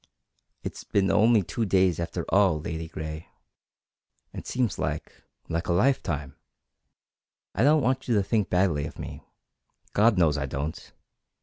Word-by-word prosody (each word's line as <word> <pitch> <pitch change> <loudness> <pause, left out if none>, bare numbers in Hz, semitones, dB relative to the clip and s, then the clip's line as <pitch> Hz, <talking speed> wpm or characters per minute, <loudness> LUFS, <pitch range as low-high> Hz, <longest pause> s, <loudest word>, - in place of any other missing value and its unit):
"It's - - -6
been 95 -1 +1
only 110 -1 +4
two 115 - -3
days 95 -4 +2
after 85 0 -3
all, 95 -6 +4
Ladygray. 80 0 -6 1.1
It - - -8
seems 125 -7 -1
like - - -3 0.3
like 85 +1 -2
a 85 - +2
lifetime. 85 - 0 1.2
I - - -1
don't 150 +1 +5
want 130 +2 0
you 120 - +2
to 100 - +3
think 105 0 0
badly 90 -6 +1
of - - -11
me. - - -7 0.7
God 110 0 +4
knows 80 -4 +3
I 70 - -2
don't!" 70 +4 -5
90 Hz, 140 wpm, -26 LUFS, 80-110 Hz, 1.2 s, don't